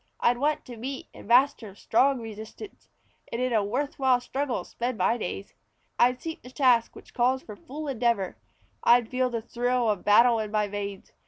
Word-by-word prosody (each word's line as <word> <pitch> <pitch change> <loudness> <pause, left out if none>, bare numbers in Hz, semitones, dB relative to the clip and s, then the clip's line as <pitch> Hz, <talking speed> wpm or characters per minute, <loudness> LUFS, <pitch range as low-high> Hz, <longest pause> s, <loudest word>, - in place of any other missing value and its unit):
I'd 240 0 +2
want 300 +2 0
to 240 -2 -9
meet 265 +4 -6
and - - -13
master 240 -4 +3
strong 260 +5 +2
resistance, 220 - -10 0.4
And 230 - -3
in 255 -1 0
a 215 -2 +3
worth 270 +9 -3
while 260 -2 +4
struggle 265 +1 -3
spend 240 0 -4
my 230 - +2
days. 200 -3 -5 0.5
I'd 250 +1 +4
seek 325 +3 -6
the 250 - -12
task 250 -3 +2
which - - -14
calls 255 +2 +1
for 210 - -9
full 295 +8 -8
endeavor; 235 -7 0 0.5
I'd 235 -1 +5
feel 255 0 +1
the 230 -2 -4
thrill 240 0 0
of 205 - -4
battle 230 +3 +5
in 215 -1 -3
my 210 0 0
veins. 200 -1 -6
240 Hz, 185 wpm, -27 LUFS, 220-260 Hz, 0.5 s, I'd